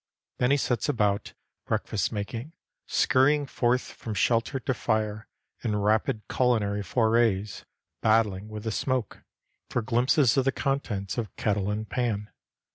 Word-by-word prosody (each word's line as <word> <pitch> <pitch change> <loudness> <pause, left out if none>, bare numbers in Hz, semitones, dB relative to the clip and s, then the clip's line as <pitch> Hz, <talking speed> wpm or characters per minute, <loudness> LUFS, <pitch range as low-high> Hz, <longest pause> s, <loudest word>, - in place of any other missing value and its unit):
Then 125 - +3
he 140 - +4
sets 125 0 0
about 105 -7 0 0.3
breakfast 100 -3 -1
making, 115 +8 -5 0.3
scurrying 145 +3 +3
forth 125 -1 +1
from 110 -2 -7
shelter 115 +6 +1
to 130 - -1
fire, 110 -2 -1 0.4
in 110 -3 0
rapid 105 +1 +1
culinary 110 -5 +1
forays, 110 -1 +1 0.4
battling 105 -3 +2
with 105 -1 -7
the 110 - -2
smoke, 130 0 -2 0.5
for 120 - -1
glimpses 125 +3 +3
of 135 - +3
the 135 - +3
contents 125 -8 -2
of 110 -5 -5
kettle 100 -1 0
and 105 +1 -2
pan. 110 -4 -2
110 Hz, 135 wpm, -27 LUFS, 105-125 Hz, 0.5 s, he